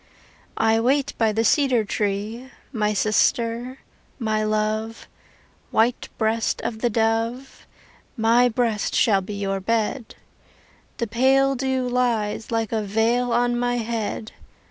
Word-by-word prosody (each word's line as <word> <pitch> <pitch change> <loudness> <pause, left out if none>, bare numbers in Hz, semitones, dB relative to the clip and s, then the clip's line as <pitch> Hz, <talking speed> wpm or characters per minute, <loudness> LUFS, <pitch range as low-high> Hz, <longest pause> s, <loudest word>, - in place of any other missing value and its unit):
I 225 0 +3
wait 270 +4 +1
by 225 -1 +3
the 220 +2 0
cedar 250 -2 +3
tree, 210 +5 -3 0.2
My 210 -3 0
sister, 230 +4 0 0.4
my 215 -3 -1
love, 215 +1 -2 0.6
White 230 +2 +1
breast 220 0 0
of 220 - -3
the 240 - +1
dove, 230 +4 -1 0.5
My 235 +2 +4
breast 225 -2 -1
shall 200 -4 +3
be 205 +2 -7
your 195 -1 -2
bed. 225 +4 -2 0.8
The 235 - -1
pale 265 +5 +3
dew 260 -1 -1
lies 235 -4 -1
Like 225 -2 -1
a 220 -1 0
veil 225 +4 +1
on 240 0 +1
my 245 0 0
head. 225 -1 -3
225 Hz, 125 wpm, -23 LUFS, 215-245 Hz, 0.8 s, My